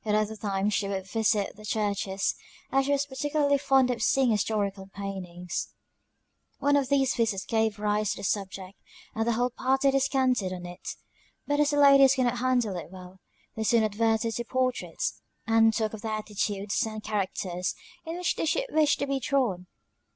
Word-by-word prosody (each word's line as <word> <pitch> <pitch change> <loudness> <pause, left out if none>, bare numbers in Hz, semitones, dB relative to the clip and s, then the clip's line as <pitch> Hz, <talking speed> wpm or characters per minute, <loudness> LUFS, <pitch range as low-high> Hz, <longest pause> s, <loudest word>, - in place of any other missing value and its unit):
At 210 -1 +1
other 215 0 0
times 200 -1 -1
she 200 - 0
would 190 -1 -3
visit 210 -1 0
the 215 - -14
churches, 200 -2 -1 0.4
as 270 0 +2
she 285 - 0
was 285 0 +2
particularly 285 +1 0
fond 265 -2 +3
of 235 -2 -3
seeing 260 +1 +3
historical 205 -2 -1
paintings. 185 -3 -6 0.8
One 285 0 +2
of 275 -2 +1
these 270 -2 +3
visits 220 -5 0
gave 220 -2 0
rise 210 0 0
to - - -10
the - - -8
subject, 190 -1 -3 0.3
and 225 +1 -1
the 235 - +3
whole 245 +2 0
party 265 +2 +2
descanted 260 -7 +1
on 180 -1 -7
it; 175 +1 -7 0.5
but 290 0 0
as 295 -1 +4
the 290 - 0
ladies 275 -1 +7
could 260 - +1
not 240 0 0
handle 245 -6 +1
it 170 - -7
well, 185 0 -12 0.4
they 220 - -2
soon 225 +1 +3
adverted 225 +1 +1
to 240 - -2
portraits; 255 +1 -2 0.2
and 225 0 +5
talked 220 -1 -1
of 220 - -7
the 225 - -4
attitudes 210 -2 -2
and 215 -1 -5
characters 185 -4 -2 0.3
in 330 +1 -5
which 360 -1 0
they - - -1
should 410 +11 +1
wish 310 -2 +3
to 280 - -1
be 275 -1 -1
drawn. 230 -9 0
220 Hz, 185 wpm, -27 LUFS, 200-265 Hz, 0.8 s, ladies